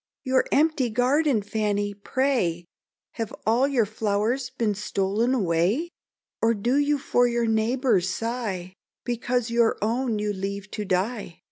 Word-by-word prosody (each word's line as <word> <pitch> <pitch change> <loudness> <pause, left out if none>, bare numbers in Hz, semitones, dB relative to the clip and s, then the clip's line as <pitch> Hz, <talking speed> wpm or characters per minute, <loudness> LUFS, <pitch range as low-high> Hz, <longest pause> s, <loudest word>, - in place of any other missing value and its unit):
"Your 260 -1 +2
empty 300 -4 +2
garden, 250 +1 +2
Fanny! 205 -1 -1
pray 205 -6 0 0.5
Have 225 -2 -2
all 235 +5 +3
your 255 -6 +2
flowers 220 +4 -1
been 230 -5 -1
stol'n 210 +4 0
away? 200 - +1 0.5
Or 230 +1 +3
do 240 +6 +1
you 290 0 +2
for 245 -2 +2
your 235 -1 0
neighbour's 225 -3 +1
sigh, 205 -4 -3 0.3
Because 245 -1 -1
your 235 -1 +3
own 230 +1 0
you 210 0 -1
leave 200 +1 -5
to 210 - -4
die? 190 -1 -2
225 Hz, 135 wpm, -25 LUFS, 205-250 Hz, 0.5 s, all